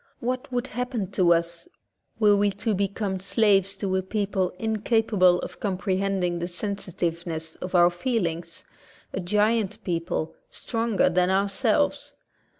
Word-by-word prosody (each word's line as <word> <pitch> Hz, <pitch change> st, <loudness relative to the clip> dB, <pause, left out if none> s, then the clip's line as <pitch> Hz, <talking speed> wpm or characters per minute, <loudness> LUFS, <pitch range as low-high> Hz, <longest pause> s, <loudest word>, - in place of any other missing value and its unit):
What 255 Hz, +2 st, -3 dB
would 245 Hz, 0 st, -1 dB
happen 245 Hz, -5 st, -3 dB
to 180 Hz, -3 st, +3 dB
us 170 Hz, -, 0 dB, 0.5 s
were 210 Hz, -2 st, +5 dB
we 205 Hz, 0 st, +3 dB
to 210 Hz, +3 st, -1 dB
become 200 Hz, 0 st, -1 dB
slaves 195 Hz, -1 st, +2 dB
to 190 Hz, -2 st, -1 dB
a 190 Hz, -, +2 dB
people 195 Hz, -1 st, -1 dB
incapable 220 Hz, -3 st, +2 dB
of -, -, -8 dB
comprehending 190 Hz, -2 st, -1 dB
the 170 Hz, -, -2 dB
sensitiveness 170 Hz, -4 st, -3 dB
of 185 Hz, 0 st, -5 dB
our 175 Hz, 0 st, +6 dB
feelings 175 Hz, -5 st, -3 dB, 0.2 s
— -, -, -28 dB
a -, -, -2 dB
giant 210 Hz, +3 st, +1 dB
people, 170 Hz, -2 st, -2 dB, 0.2 s
stronger 230 Hz, -3 st, 0 dB
than 180 Hz, 0 st, +2 dB
ourselves? 200 Hz, +8 st, +1 dB
195 Hz, 135 wpm, -25 LUFS, 180-215 Hz, 0.5 s, our